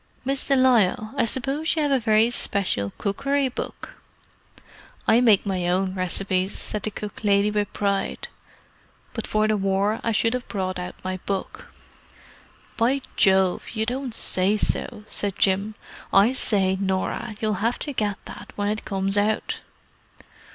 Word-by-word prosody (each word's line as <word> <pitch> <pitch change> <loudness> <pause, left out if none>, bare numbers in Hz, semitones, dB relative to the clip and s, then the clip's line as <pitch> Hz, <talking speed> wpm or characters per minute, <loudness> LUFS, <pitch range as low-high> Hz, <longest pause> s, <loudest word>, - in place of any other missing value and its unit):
"Miss 270 +1 -1
de 275 - +4
Lisle, 230 -5 +3
I 265 - +2
suppose 270 +8 -1
you 315 - +1
have 290 - +1
a 270 - +3
very 220 0 +3
special 180 - 0
cookery 275 +6 0
book?" 250 - -7 1.1
"I 230 +2 +5
make 220 -5 +5
my 185 -3 -1
own 185 +1 +1
recipes," 185 +1 -1
said 210 - -2
the 215 - -2
cook 210 +1 -8
lady 200 0 +3
with 205 -1 -1
pride. 200 - -1 0.9
"But 225 - -4
for 215 0 +2
the 215 0 +2
war 195 +2 +1
I 230 - +1
should 225 +1 +2
have 250 0 -3
brought 185 -3 -3
out 180 - -6
my 185 0 -3
book." 195 -1 -4 1.1
"By 260 +4 +2
Jove, 190 -3 +3
you 220 0 0
don't 250 0 -3
say 195 +1 +2
so!" 215 +1 -1
said 205 -2 -1
Jim. 195 +2 +2 0.4
"I 205 +6 +5
say, 190 -6 +2
Norah, 195 +4 -1
you'll 210 -3 -1
have 230 +3 +1
to 290 - -4
get 205 -5 -1
that - - -10
when 205 0 -1
it 215 +1 -3
comes 195 0 0
out." 215 +1 0
210 Hz, 160 wpm, -24 LUFS, 195-235 Hz, 1.1 s, I